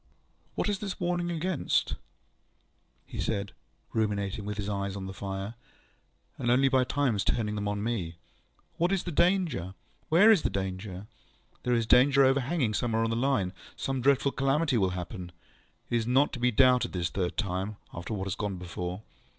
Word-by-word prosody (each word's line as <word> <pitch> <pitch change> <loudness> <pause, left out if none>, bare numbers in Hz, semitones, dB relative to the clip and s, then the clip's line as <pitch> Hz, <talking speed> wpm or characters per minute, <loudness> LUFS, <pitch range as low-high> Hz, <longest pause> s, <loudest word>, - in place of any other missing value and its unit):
ŌĆ£What - - 0
is 205 -2 -1
its 200 -3 -4
warning 175 0 0
against? 175 +2 0
ŌĆØ - - -2 1.1
he - - -8
said, 100 -2 -2 0.4
ruminating, 100 -2 -1
with 105 0 -4
his 100 -1 -3
eyes 100 -1 -2
on 95 -1 -5
the 95 - -6
fire, 95 +2 -5 0.9
and 120 - 0
only 135 +3 +4
by 130 -1 +4
times 125 -6 0
turning 105 -3 0
them 105 -1 -2
on 105 0 -2
me. 100 -8 -2 0.6
ŌĆ£What 175 +3 +2
is 195 -2 +1
the 175 - -4
danger? 170 - +1 0.3
Where 195 +8 +7
is 205 -7 +5
the - - 0
danger? 95 0 -4 0.6
There 125 -1 +1
is 115 -1 +1
danger 135 +4 +6
overhanging 135 -2 +1
somewhere 110 +2 0
on 115 - 0
the - - 0
Line. 115 -7 +1 0.2
Some 135 -1 -2
dreadful 140 +1 +3
calamity 135 +2 +1
will 95 -2 +2
happen. 90 0 -6 0.6
It 120 - +3
is 115 -1 -1
not 130 +4 +3
to 125 - -4
be 125 +1 +3
doubted 125 +1 +4
this 85 -2 -1
third 90 -2 -2
time, 95 +1 -2 0.2
after 90 +6 -4
what 95 -1 -3
has 95 - -2
gone 100 -2 -3
before. 90 +2 -5
115 Hz, 180 wpm, -29 LUFS, 100-135 Hz, 1.1 s, Where